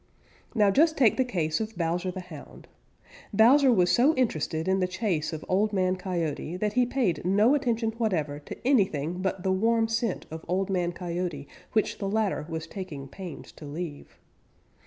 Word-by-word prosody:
Now 205 -3 +4
just 315 +8 +3
take 240 -6 +5
the 260 - +4
case 165 -11 -1
of 220 -2 -5
Bowser 175 +2 -1
the 185 +1 -5
Hound. 165 -5 -12 0.6
Bowser 250 +6 +6
was 180 -6 +3
so 260 - +4
interested 160 - -1
in 190 0 +2
the 180 - +1
chase 175 -5 -1
of 160 -1 -6
Old 205 +3 +1
Man 185 -1 +2
Coyote 175 -3 -3
that 210 +2 -1
he 250 -1 +3
paid 230 - 0
no 205 +8 +4
attention 235 -5 0
whatever 155 -10 -1
to 145 - -9
anything 180 - +1
but 190 -1 -2
the 190 - +1
warm 225 +4 +2
scent 225 -2 -1
of 160 0 -7
Old 190 +2 0
Man 175 -2 0
Coyote 170 -5 -4 0.3
which 215 - 0
the 195 - -2
latter 205 -7 0
was 160 -1 -4
taking 165 -7 -7
pains 180 0 -9
to 155 - -12
leave. 150 0 -7
185 Hz, 180 wpm, -27 LUFS, 165-220 Hz, 0.6 s, Bowser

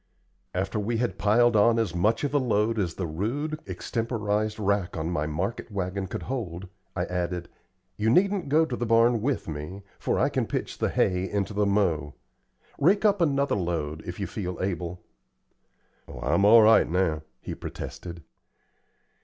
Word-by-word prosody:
After 95 +3 -1
we 115 +3 -1
had 110 -6 -2
piled 110 +4 +4
on 115 +2 +5
as 110 -7 0
much 105 +9 +1
of 145 - -1
a 145 - +4
load 115 -3 +1
as 85 -5 -1
the 95 - -3
rude, 125 - -2
extemporized 105 +2 -2
rack 100 -4 0
on 80 +2 -2
my 75 -3 -1
market 95 +12 -3
wagon 95 0 -3
could - - -5
hold, 95 -8 -4 0.3
I 90 -1 0
added, 90 -1 -3 0.5
"You 110 +1 +1
needn't 190 - +2
go 155 +3 +4
to 130 - -3
the 120 -1 -3
barn 115 0 +4
with 135 +3 -1
me, 80 +6 -6 0.2
for - - 0
I - - +3
can - - -1
pitch - - -4
the - - +1
hay 95 0 +1
into 100 0 -1
the 105 0 +1
mow. 85 -8 +1 0.6
Rake 195 +9 +3
up 200 -3 +3
another 140 -3 +2
load, 80 -5 -2
if 90 +2 -7
you 100 - -1
feel 90 -5 -4
able." 90 -2 -3 1.0
"Oh, - - -9
I'm 85 +10 +2
all 110 +2 +8
right 110 0 +6
now," 85 -3 +1 0.2
he - - -6
protested. 85 -2 -7
100 Hz, 170 wpm, -26 LUFS, 90-115 Hz, 1.0 s, all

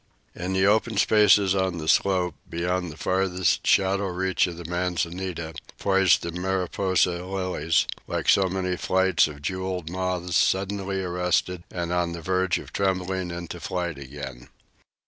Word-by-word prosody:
In 90 +1 -4
the 95 0 +3
open 110 +1 +2
spaces 105 -2 +5
on 95 -2 0
the 80 -1 -5
slope, 90 0 +2 0.2
beyond 90 +1 -2
the 75 - -12
farthest 95 -1 0
shadow 95 +1 +3
reach 95 +1 +1
of 85 -2 -7
the 85 - -8
manzanita, 90 -1 -3 0.2
poised 95 -4 +3
the 85 - -3
mariposa 90 0 0
lilies, 90 -3 0 0.2
like - - -3
so 95 -1 +5
many 90 -1 -1
flights 95 -1 +3
of 70 -2 -10
jewelled 95 -1 -3
moths 90 -1 -2
suddenly 95 0 +1
arrested 90 0 0
and 85 -1 -3
on 90 -1 0
the 85 - -6
verge 95 0 +1
of - - -10
trembling 95 -1 -1
into 85 0 -6
flight 85 -4 -3
again. 65 -3 -8
90 Hz, 145 wpm, -25 LUFS, 85-95 Hz, 0.2 s, spaces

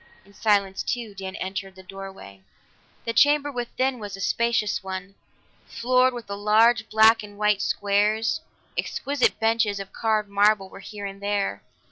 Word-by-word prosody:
In 200 - -20
silence 200 -2 +1
too, 235 -4 -3
Dan 190 -1 -7
entered 195 0 -5
the 190 - -13
doorway. 190 - -10 0.6
The 230 - -1
chamber 290 +4 +4
within 255 +1 -2
was 205 -2 -7
a - - -12
spacious 215 -1 0
one, 190 0 -6 0.5
floored 255 +2 +2
with 240 -3 -8
large 215 +3 +3
black 220 +1 +6
and 205 -1 -11
white 210 -1 +2
squares; 210 +7 +1 0.3
exquisite 280 -1 0
benches 225 -2 +1
of 195 -1 -8
carved 215 -2 0
marble 200 -1 +2
were - - -12
here 205 +1 -8
and 195 0 -7
there. 200 -1 -1
210 Hz, 150 wpm, -25 LUFS, 195-230 Hz, 0.6 s, black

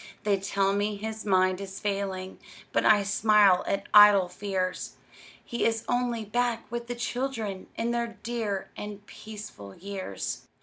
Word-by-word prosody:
They 200 -2 +2
tell 195 0 +1
me 205 +1 0
his 220 +1 -6
mind 185 -1 +3
is 195 0 -7
failing, 195 -2 -3 0.3
But - - +1
I 210 -2 +6
smile 205 -2 +4
at 195 - -1
idle 205 -3 +8
fears; 185 0 -3 0.5
He 235 - -2
is 225 0 +1
only 245 -2 0
back 240 +1 -1
with 235 0 -4
the 245 - -4
children, 240 -5 -3
In 230 +1 -1
the 235 -1 -2
dear 225 -5 -3
and 205 -1 -8
peaceful 205 - -10
years. 190 - -5
205 Hz, 145 wpm, -27 LUFS, 195-230 Hz, 0.5 s, idle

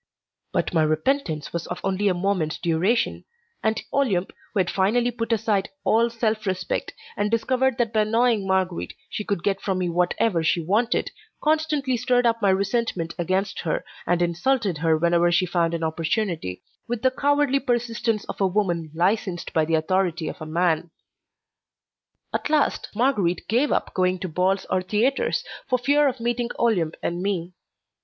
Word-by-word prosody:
But - - -1
my 165 - +3
repentance 155 - 0
was 170 -1 -3 0.2
only 195 +1 0
of 185 -3 +2
a - - -5
moment's 180 -5 0
duration, 175 +8 +1 0.4
and 220 0 +1
Olympe, 205 -10 +1 0.2
who 210 - -1
had 180 - -1
finally 235 +6 +2
put 230 -1 -4
aside 210 -3 +1
all 230 +2 +3
self 220 -2 -1
respect, 185 -1 -2 0.2
and 205 0 0
discovered 255 +3 +1
that 230 -2 0
by 215 - +3
annoying 225 -1 +2
Marguerite 190 -2 -1 0.2
she 210 - -3
could 200 -4 -2
get 195 -1 0
from 190 -2 -1
me 180 -1 0
whatever 175 +2 +1
she 160 +2 +2
wanted, 210 +9 +1 0.3
constantly 300 -4 +1
stirred 245 +1 +2
up 230 -1 +2
my 200 - +3
resentment 190 -3 0
against 185 +4 -1
her, - - -2 0.2
and 175 0 +2
insulted 180 - 0
her 160 -1 +3
whenever 170 +1 +3
she 185 +2 +3
found 170 -1 0
an 165 - -3
opportunity, 160 - -2 0.2
with 235 -1 -3
the 260 - +4
cowardly 285 0 +2
persistence 235 -4 -1
of - - -6
a 195 - +4
woman 175 -5 0
licensed 180 0 0
by 160 -1 +3
the 165 +1 +1
authority 175 0 0
of - - -6
a 155 - -5
man. 170 0 +1 1.4
At - - -2
last 300 -2 +1
Marguerite 205 -8 +1
gave 245 +7 +2
up - - 0
going 185 0 +1
to 185 - -2
balls 185 +4 0
or 185 - +1
theatres, 220 +9 +1 0.3
for 255 - +3
fear 285 +4 +3
of 260 -2 -2
meeting 240 0 -1
Olympe 180 -9 +1
and 175 +1 -2
me. 185 -3 -2
195 Hz, 170 wpm, -24 LUFS, 175-235 Hz, 1.4 s, the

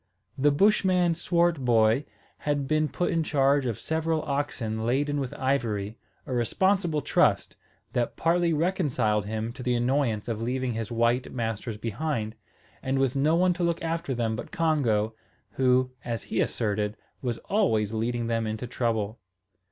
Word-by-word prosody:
The 145 +2 +3
Bushman 180 +1 +3
Swartboy 140 -8 +2 0.3
had 145 -2 -1
been 155 +1 +2
put 175 - -1
in 165 -2 +1
charge 140 -2 +2
of 115 - -2
several 160 0 -1
oxen 130 -6 -2
laden 145 +5 +1
with 135 -3 -3
ivory, 115 -6 -1 0.3
a 130 - -4
responsible 165 - +1
trust, - - +2 0.4
that 120 -1 0
partly 170 +1 +2
reconciled 145 - +1
him 110 +2 -3
to 130 - -9
the 125 -1 +1
annoyance 120 -3 0
of 115 -2 -3
leaving 130 +2 -1
his 115 -1 -4
white 120 +2 +1
masters 115 -2 -3
behind, 115 0 -2 0.5
and 135 +1 -1
with 135 -1 +1
no 150 +4 +3
one 180 +1 +3
to 175 0 -3
look 170 -1 0
after 165 -4 -2
them 115 -2 0
but 110 - -7
Congo, 120 -10 +1 0.4
who, 130 0 +2
as 115 -2 -3
he 110 - -1
asserted, 105 -1 -1 0.2
was 120 -3 -2
always 115 - +1
leading 120 +2 -1
them 115 -1 0
into 110 +3 -3
trouble. 115 -3 -1
130 Hz, 150 wpm, -27 LUFS, 115-155 Hz, 0.5 s, The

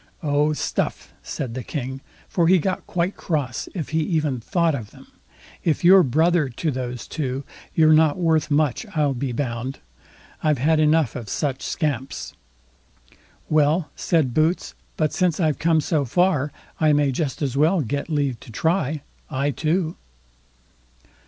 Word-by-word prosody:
"Oh, 145 0 +2
stuff!" - - -3
said 120 -4 -5
the 130 - -4
King, 130 +1 -5 0.3
for 170 -2 +1
he 185 +2 +6
got 185 +3 -2
quite 180 +2 -1
cross 145 -7 -2
if 165 -5 -4
he 160 - 0
even 155 -5 0
thought 170 - +1
of 115 -7 -5
them; - - -16 0.6
"if 160 0 0
you're 190 +2 +8
brother 160 +2 +2
to 150 +6 -2
those 125 -2 -4
two, 135 -3 -3 0.3
you're 155 -1 +6
not 155 0 +4
worth 165 -3 +2
much, 145 -3 +1
I'll 145 -3 +2
be 130 0 -3
bound. 125 +1 -3 0.6
I've 150 -2 +2
had 155 +5 +2
enough 155 -4 +3
of 115 -5 -6
such 135 +1 -2
scamps." 140 -5 -3 1.1
"Well", 150 +1 +2
said 155 -8 +1
Boots; 160 +5 +1 0.2
but 155 -2 +1
since 180 -3 +1
I've 155 -6 +1
come 160 -1 +3
so 150 -1 0
far, 150 0 +2 0.3
I 155 -1 +4
may 145 -1 +3
just 140 +2 -2
as 135 -2 -1
well 160 +5 +3
get 140 +5 -3
leave 140 -6 0
to - - -13
try, 155 - 0 0.3
I 140 +2 0
too." 160 +4 -1
150 Hz, 155 wpm, -23 LUFS, 135-160 Hz, 1.1 s, you're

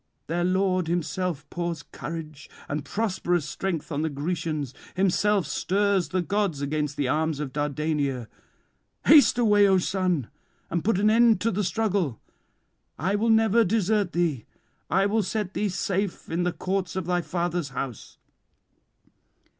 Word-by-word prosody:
Their 175 +2 -1
lord 185 -1 +1
himself 175 -2 -2
pours 170 -3 -3
courage 155 -2 -8 0.2
and 145 0 -3
prosperous 180 -6 -1
strength 170 +1 -3
on 145 0 -1
the 160 - 0
Grecians, 155 -2 -3 0.2
himself 195 +1 +2
stirs 195 +5 +1
the 185 -1 0
gods 200 -5 0
against 145 0 -2
the 140 - 0
arms 155 +1 0
of 140 -4 -4
Dardania. 145 -3 -1 0.8
Haste 290 -5 +7
away, 210 -4 +5
O 190 -1 +4
son, 180 - 0 0.4
and 170 -1 -1
put 220 -2 +2
an 210 +1 +4
end 230 0 +5
to 230 - +1
the 205 +2 -1
struggle. 195 - 0 0.8
I 185 +7 0
will 215 +3 +1
never 225 0 +5
desert 205 -2 +1
thee; 165 -9 0 0.4
I 195 +2 +3
will 215 +2 +2
set 205 -1 -3
thee 210 - 0
safe 195 0 -2
in 165 +2 0
the 180 - +1
courts 185 -1 -2
of 190 -2 -2
thy 180 0 +1
father's 175 -3 -2
house." 130 -3 -6
180 Hz, 145 wpm, -26 LUFS, 155-200 Hz, 0.8 s, Haste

